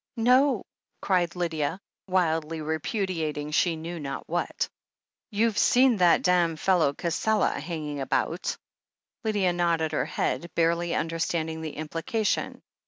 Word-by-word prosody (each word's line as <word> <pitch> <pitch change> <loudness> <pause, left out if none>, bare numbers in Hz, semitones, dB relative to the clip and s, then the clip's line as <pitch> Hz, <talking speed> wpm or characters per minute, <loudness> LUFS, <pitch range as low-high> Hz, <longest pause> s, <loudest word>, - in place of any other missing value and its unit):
"No 250 +1 +4 0.2
!" - - -51
cried 180 -3 +1
Lydia, 165 -1 -1 0.3
wildly 165 -3 0
repudiating 155 -1 -2
she 165 +2 +2
knew 165 +2 -6
not 140 -2 -5
what. 175 +1 -1 0.6
"You've 220 0 +1
seen 250 -2 +5
that 175 -2 +4
dam' 175 -2 +3
fellow 160 -3 +2
Cassela 175 +7 0
hanging 150 -2 -4
about?" 135 - -1 0.7
Lydia 205 -5 +1
nodded 170 -2 +1
her 155 - 0
head, 170 - -2
barely 170 +1 +2
imderstanding 165 -1 -1
the 155 -2 -5
implication. 165 +8 -2
170 Hz, 120 wpm, -27 LUFS, 160-185 Hz, 0.7 s, seen